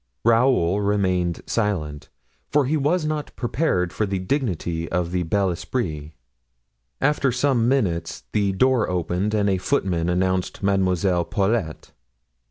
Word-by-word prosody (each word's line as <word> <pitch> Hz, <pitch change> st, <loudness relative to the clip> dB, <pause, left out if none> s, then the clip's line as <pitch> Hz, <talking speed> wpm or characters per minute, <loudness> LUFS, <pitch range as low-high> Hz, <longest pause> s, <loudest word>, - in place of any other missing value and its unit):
Raoul 115 Hz, -6 st, +3 dB
remained 95 Hz, -4 st, 0 dB
silent, 85 Hz, -10 st, -2 dB, 0.4 s
for 145 Hz, -2 st, +2 dB
he 145 Hz, +5 st, 0 dB
was 155 Hz, +3 st, +1 dB
not 155 Hz, -1 st, -3 dB
prepared 120 Hz, -, 0 dB
for 105 Hz, -, -1 dB
the 95 Hz, 0 st, -1 dB
dignity 90 Hz, -, -2 dB
of 85 Hz, 0 st, -1 dB
the 90 Hz, 0 st, 0 dB
bel 95 Hz, +2 st, +1 dB
esprit. 80 Hz, -, -4 dB, 0.9 s
After 140 Hz, -1 st, +2 dB
some 125 Hz, -2 st, +1 dB
minutes 85 Hz, -, 0 dB
the 100 Hz, -2 st, +1 dB
door 125 Hz, +3 st, +2 dB
opened 90 Hz, +4 st, -1 dB
and 105 Hz, -1 st, +2 dB
a 95 Hz, -2 st, +1 dB
footman 90 Hz, -2 st, 0 dB
announced 95 Hz, +2 st, -1 dB
Mademoiselle 95 Hz, -2 st, +1 dB
Paulet. 100 Hz, -5 st, -1 dB
95 Hz, 130 wpm, -23 LUFS, 90-120 Hz, 0.9 s, Raoul